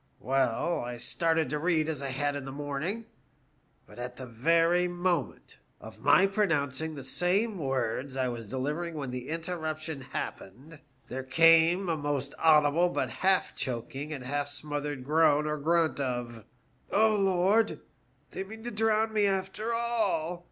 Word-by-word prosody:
Well, 135 +5 0
I 120 0 -5
started 160 +5 0
to 150 - -1
read 160 -1 +1
as 155 -4 -3
I 140 - -3
had 145 +2 -1
in 140 - -4
the 135 - -6
morning, 145 +10 -3 0.8
but - - -14
at 125 +1 -6
ihe 130 - -7
very 165 +9 +3
moment, 175 -5 -2 0.2
of - - -12
my 195 - +5
pronouncing 160 -7 0
the 140 - -7
same 185 - 0
words 135 -1 -2
I 130 -1 +1
was 120 -3 -5
delivering 150 +7 -3
when 140 -4 -4
the 125 +1 -6
interruption 160 -2 -4
happened, 130 +4 -7 0.3
there 130 - -4
came 165 +6 +5
a 165 - +1
most 145 -2 -2
audible 155 +2 +5
but 130 -7 -2
half 190 +9 +1
choking 135 +4 -4
and 140 -4 -5
half 145 +2 -2
smothered 145 -1 -4
groan 150 +1 +3
or 150 0 -2
grunt 165 +1 +1
of 120 -4 -3 0.2
' - - -37
OA, 215 +1 +4
Lord, 195 +3 +2 0.5
they - - -4
mean 220 +3 -11
to 240 - -4
drown 220 0 +1
me 210 -2 +3
after 195 +3 -2
all! 215 -8 0
155 Hz, 160 wpm, -29 LUFS, 135-180 Hz, 0.8 s, my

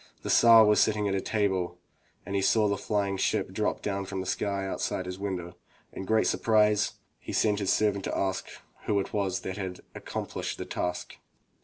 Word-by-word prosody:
The - - -1
Tsar 115 -1 +8
was 105 0 +4
sitting 105 -1 +2
at 95 -1 -1
table 95 -5 0 0.5
when 100 - -7
he 100 - +1
saw 105 +2 +3
the 100 - +1
flying 100 -1 -1
ship - - 0
drop - - -2
down 100 -1 -2
from 95 0 -5
the 95 - -4
sky 100 +1 -1
just 95 - -3 0.2
outside 95 - -3
his 90 +1 -6
window. 90 -3 -4 0.4
In 95 - -6
great 110 +2 +2
surprise, 105 -2 +2 0.3
he - - -8
sent 105 -1 +2
his 100 -2 +1
servant 100 -2 +1
to - - -2
ask 95 -1 -1 0.4
who 105 -1 +2
it 95 - -4
was 95 -3 -1
that 95 +1 -5
had 95 -2 -5
accom - - -5
plished - - -4
the - - -6
task. 90 0 -4
100 Hz, 200 wpm, -28 LUFS, 95-105 Hz, 0.5 s, Tsar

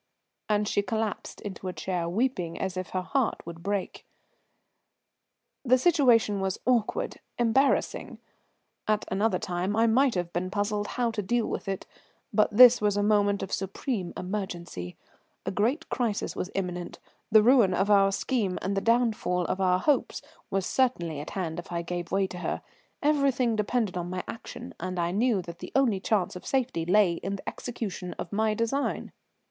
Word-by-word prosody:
And 210 0 +2
she 205 - +2
collapsed 215 +1 -3
into 195 -2 -6
a 180 - -3
chair, 175 -3 -2
weeping 185 -5 -1
as 190 -1 -2
if 185 -2 -4
her 185 -1 -2
heart 265 +4 -1
would 170 0 -8
break. 200 +1 -3 1.6
The 255 -1 +5
situation 245 - +4
was 190 -1 -1
awkward, 240 -4 0 0.2
embarrassing. 245 +4 +1 0.7
At 215 -1 +1
another 205 +4 +2
time 180 +3 -2
I 225 +1 +4
might 245 +2 +3
have 175 -1 -2
been 180 +2 -1
puzzled 205 +1 -1
how 240 -2 +1
to 220 -2 -2
deal 235 +3 0
with - - -4
it, 195 -1 -3 0.5
but 215 - +4
this 245 +2 +8
was 205 -1 +2
a 205 - +2
moment 205 -1 +2
of 195 - -5
supreme 195 0 -3
emergency. 175 - -5 0.5
A - - -1
great 240 - 0
crisis 230 -5 -1
was 185 - -3
imminent, 180 -2 -3 0.3
the 215 -1 +7
ruin 230 -6 +5
of 195 +3 +1
our 195 -1 +5
scheme 200 -2 -1
and 195 +2 -1
the 195 - +1
downfall 225 -6 +1
of 190 - -2
our 180 -1 +4
hopes 285 +5 0 0.3
were 195 - 0
certainly 175 - 0
at 150 - -6
hand 175 -4 -3
if 175 - -9
I 170 0 -2
gave 175 0 -4
way 195 +1 +2
to 180 -1 -7
her. - - -3 0.4
Everything 275 -5 +2
depended 215 -1 0
upon 175 -1 -3
my 180 0 -3
action, 240 +2 -8
and 185 +1 -4
I 170 0 0
knew 210 -1 +1
that 170 0 -9
the - - -8
only 245 -8 +3
chance 190 -2 0
of 180 - -8
safety 245 -11 0
lay 195 -1 +4
in 195 +2 -2
the 195 - -11
execution 200 -7 -5
of 170 - -6
my 215 +1 +1
design. 230 +6 -1
205 Hz, 175 wpm, -28 LUFS, 180-230 Hz, 1.6 s, this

